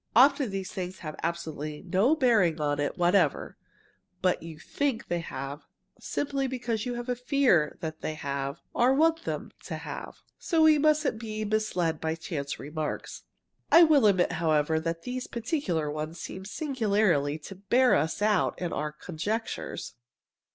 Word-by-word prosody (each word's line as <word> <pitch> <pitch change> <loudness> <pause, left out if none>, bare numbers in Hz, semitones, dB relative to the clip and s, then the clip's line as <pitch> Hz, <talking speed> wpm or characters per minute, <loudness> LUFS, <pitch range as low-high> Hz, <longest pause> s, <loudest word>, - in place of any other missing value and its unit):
Often 275 +1 +5
these 195 -1 -4
things 185 0 -5
have 155 - -5
absolutely 160 -2 -4
no 195 - +3
bearing 215 - +3
on 145 -1 0
it 145 - -1
whatever, 175 +3 +2 0.7
but 180 -1 +2
you 165 -1 -9
think 260 - -2
they 175 - 0
have, 140 -2 -6 0.3
simply 275 -1 -2
because 240 -3 -2
you 240 -1 -3
fear 250 - +2
that 160 -2 -5
they 155 - -3
have 140 -1 -4
or 250 +3 +4
want 325 +2 +3
them - - -4
to - - -4
have. - - -7 0.2
So 330 -3 +2
we 310 -1 +6
mustn't 305 -6 +2
be 215 -1 -4
misled 195 -7 0
by 160 0 -1
chance 150 -4 -4
remarks. 150 +1 -5 0.5
I 340 - +9
will 295 -8 +6
admit, 185 -3 +3
however, 160 -1 +1
that 165 +1 -3
these 250 0 -4
particular 215 - -2
ones 155 +2 -5
seem 190 +3 -7
singularly 205 - +1
to 160 +5 -10
bear 240 +7 +3
us 160 +7 +1
out 210 -2 +2
in 175 -2 -3
our 150 0 -2
conjectures." 180 +9 -4
190 Hz, 150 wpm, -28 LUFS, 160-250 Hz, 0.7 s, I